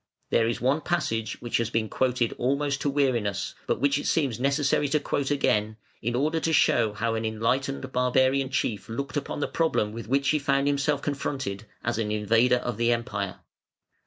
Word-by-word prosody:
There 115 - +3
is 115 - -1
one 135 +5 +1
passage 115 -12 -1
which 120 - 0
has 115 -1 -1
been 115 -1 0
quoted 125 0 0
almost 140 +2 0
to 145 - +1
weariness, 125 -8 0
but - - 0
which 140 +2 +2
it - - -4
seems 135 -8 +1
necessary 140 +2 +2
to 150 - +2
quote 140 -1 -1
again, 110 -6 +1 0.2
in 120 +2 -1
order 155 +5 +1
to 160 - 0
show 120 -8 +3
how 115 +2 -1
an 110 0 -2
enlightened 130 +5 -1
barbarian 130 +1 +2
chief 115 -6 -2
looked 140 +6 -4
upon 145 0 -3
the - - 0
problem 160 -10 0
with 115 0 -7
which 140 +3 +1
he 150 - +3
found 140 -1 +1
himself 145 0 +1
confronted, 135 -8 -3 0.2
as 120 -1 -1
an 105 -2 -1
invader 115 +4 +3
of 120 -3 -4
the 120 +1 +2
Empire. 100 -5 -2
125 Hz, 190 wpm, -26 LUFS, 115-140 Hz, 0.2 s, There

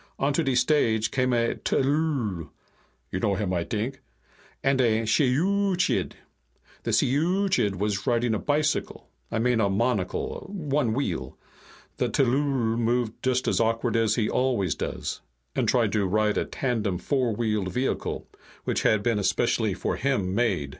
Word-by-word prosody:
Onto 145 +4 +1
de 135 -5 0
stage 125 -4 +2
came 130 -1 +1
a 115 -1 +2
tllooll 135 - 0 0.6
(you 90 - -2
know 100 -1 +1
him, 95 -2 -2
I 85 -1 0
t'ink), 115 +7 -3 0.6
and 135 -1 +3
a 115 -2 +2
shiyooch'iid. 180 - +1 0.7
The - - -4
shiyooch'iid 170 - +2
was 100 +1 -2
riding 120 -1 +2
a 110 - 0
bicycle 150 0 -1 0.2
I - - -1
mean 120 0 +2
a 100 - +2
monocle. 105 -1 -1
One 145 - 0
wheel. 65 - -3 0.6
The - - 0
tllooll 130 -3 +1
moved 120 -1 0
just 130 0 0
as - - +2
awkward 115 +1 +1
as 115 -1 +2
he 110 -3 +1
always 120 - +1
does, - - -4 0.3
and - - +1
tried - - +2
to 100 -3 +1
ride 105 +2 +1
a - - -1
tandem 110 -8 -1
four 125 0 0
wheeled 105 -4 -1
vehicle 130 +2 -2 0.4
which - - -1
had 105 -2 +2
been 115 -2 +1
especially 100 - +1
for - - -2
him 120 -9 0
made." 100 -11 0
120 Hz, 150 wpm, -26 LUFS, 105-135 Hz, 0.7 s, and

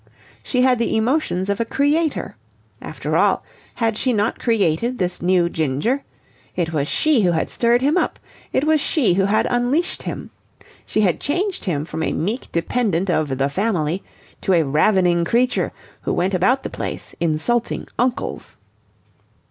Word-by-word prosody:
She 250 -1 0
had 255 -2 +3
the 230 -1 +1
emotions 220 - 0
of 200 0 -1
a - - +3
creator. 290 +6 0 0.5
After - - -4
all, - - +3 0.3
had 225 -2 0
she 255 - +1
not 210 +1 0
created 225 +1 +1
this 180 -3 -2
new 180 0 +3
Ginger? 160 - -1 0.5
It 165 -2 -1
was 145 -2 0
she 305 - +2
who 180 -3 +3
had 160 - -1
stirred 240 +1 +2
him 295 +6 +3
up. - - 0 0.3
It 265 - +1
was 310 -1 +3
she 270 - +2
who 190 +2 +2
had 210 +2 +2
unleashed 250 +8 0
him. - - -6 0.6
She 215 - +1
had 185 -5 +2
changed 370 +6 -2
him 155 -6 -1
from 160 0 -5
a - - 0
meek 215 +10 -2
dependent 190 0 0
of 145 -5 0
the 135 +1 +2
Family 180 0 -1 0.4
to 190 - +1
a 170 -2 +4
ravening 170 +4 +3
creature, 245 +8 +1 0.3
who - - -1
went 185 +3 0
about 220 +9 +2
the - - -5
place - - -5
insulting 170 +9 0
uncles. 250 0 -2
210 Hz, 165 wpm, -21 LUFS, 170-250 Hz, 0.6 s, a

